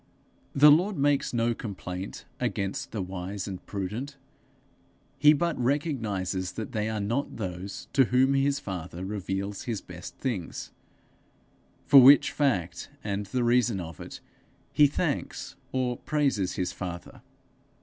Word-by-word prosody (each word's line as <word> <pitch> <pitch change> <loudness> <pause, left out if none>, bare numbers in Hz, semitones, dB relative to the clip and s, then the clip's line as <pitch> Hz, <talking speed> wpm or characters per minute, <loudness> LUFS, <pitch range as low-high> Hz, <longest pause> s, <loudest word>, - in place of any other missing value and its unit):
The 150 +2 +8
Lord 180 +6 +3
makes 145 0 +2
no 120 0 +1
complaint 95 -4 -6
against 100 -1 -2
the 105 -4 -2
wise 95 +1 -5
and 95 -2 -6
prudent; 110 +9 -4 1.0
he 150 +2 +8
but 165 +2 +1
recognizes 110 - -1
that 110 - -5
they 110 0 -1
are 110 -1 -2
not 115 +8 -2
those 95 -1 -5
to 135 - +5
whom 130 +3 +3
his 140 +1 +2
father 90 - -6
reveals 100 0 -4
his 115 -4 -2
best 90 -1 -10
things; 110 -11 -4 1.1
for 140 -1 +9
which 140 +3 +8
fact 100 - -1
and 100 -1 -3
the 125 +2 -1
reasons 120 -4 +2
of 80 -3 -8
it, - - -9 0.5
he 150 -1 +6
thanks, 145 - -3 0.2
or 125 -2 -1
praises 135 -12 0
his 90 - -2
father. 85 -2 -7
110 Hz, 135 wpm, -28 LUFS, 95-135 Hz, 1.1 s, for